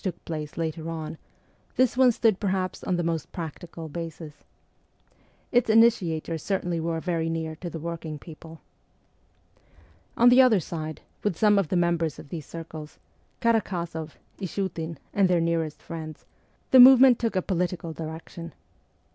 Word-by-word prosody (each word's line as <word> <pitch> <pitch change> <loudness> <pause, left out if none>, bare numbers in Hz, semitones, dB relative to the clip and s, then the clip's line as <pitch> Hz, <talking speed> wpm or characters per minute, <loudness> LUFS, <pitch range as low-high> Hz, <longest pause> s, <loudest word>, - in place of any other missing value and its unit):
PETERSBURG 185 -4 -1
35 - - -31
took - - -42
place 155 -2 -5
later 160 0 -3
on, 160 -1 -5 0.6
this 255 -2 +3
one 255 -1 +6
stood 220 -3 +2
perhaps 190 -2 -2
on 185 - 0
the 175 - -1
most 165 -2 -2
practical 165 0 -7
basis. 160 -1 -7 1.2
Its 245 -2 +3
initiators 175 -8 +3
certainly 180 -4 -1
were 165 0 -2
very 165 -1 -1
near 160 -1 -3
to 175 - -6
the 165 - -6
working 160 -1 -5
people. 160 +1 -12 1.6
On 240 +1 +7
the 250 +2 +7
other 240 -6 +5
side, 155 -1 -6 0.2
with 205 -6 -1
some 210 -2 +4
of 195 - 0
the 185 - -2
members 170 -3 +1
of - - -12
these 155 -4 -7
circles 160 -2 -9 0.4
Karak6zoff, 175 -9 -1 0.2
Ishiitin, 170 -4 -4 0.2
and 195 -2 +3
their 175 -1 +3
nearest 165 -2 -1
friends 160 -2 -8 0.5
the 260 - +8
movement 255 -1 +9
took 230 -3 -1
a 185 - +2
political 175 -3 -2
direction. 165 +1 -8
170 Hz, 155 wpm, -26 LUFS, 160-195 Hz, 1.6 s, movement